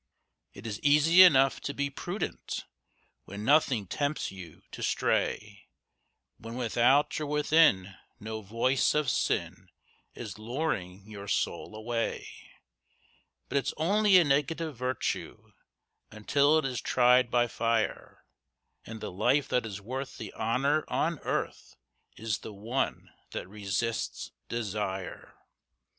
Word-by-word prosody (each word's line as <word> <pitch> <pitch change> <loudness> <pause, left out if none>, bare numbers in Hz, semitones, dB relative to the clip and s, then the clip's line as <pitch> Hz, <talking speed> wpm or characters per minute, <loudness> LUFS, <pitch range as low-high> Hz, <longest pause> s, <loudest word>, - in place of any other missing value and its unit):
It - - -11
is 105 -2 -4
easy 150 +5 +6
enough 135 -7 +6
to 140 - -4
be 140 0 -1
prudent 175 +8 -5 0.6
When 100 +2 -7
nothing 135 -7 +3
tempts 145 +10 -2
you 90 -5 -11
to - - -8
stray, - - -1 0.7
When 115 +1 -8
without 125 +5 +2
or 150 - -2
within 150 - +3 0.2
no 110 +1 -6
voice 115 +8 +1
of 150 -4 +2
sin - - -2 0.5
Is 105 -3 -7
luring 110 - -3
your 100 -2 -9
soul 110 - -2
away; 115 +1 -3 1.2
But 140 - +1
it's - - -3
only 200 +4 +4
a 180 - +7
negative 150 +2 0
virtue 125 +2 -3 0.6
Until 140 +8 +2
it 155 - 0
is 130 -2 -2
tried 125 0 +4
by 120 0 +3
fire, 115 -1 -2 0.6
And 110 -1 -9
the - - -5
life 125 +10 +2
that 125 -2 0
is 100 -2 -6
worth 130 +5 -6
the 110 - -7
honour 140 +7 +1
on 165 -2 -1
earth - - -4 0.4
Is 110 -3 -2
the 110 - -9
one 115 +7 -3 0.2
that - - -5
resists 105 +3 -3 0.2
desire. 100 -4 -4
120 Hz, 125 wpm, -29 LUFS, 110-145 Hz, 1.2 s, a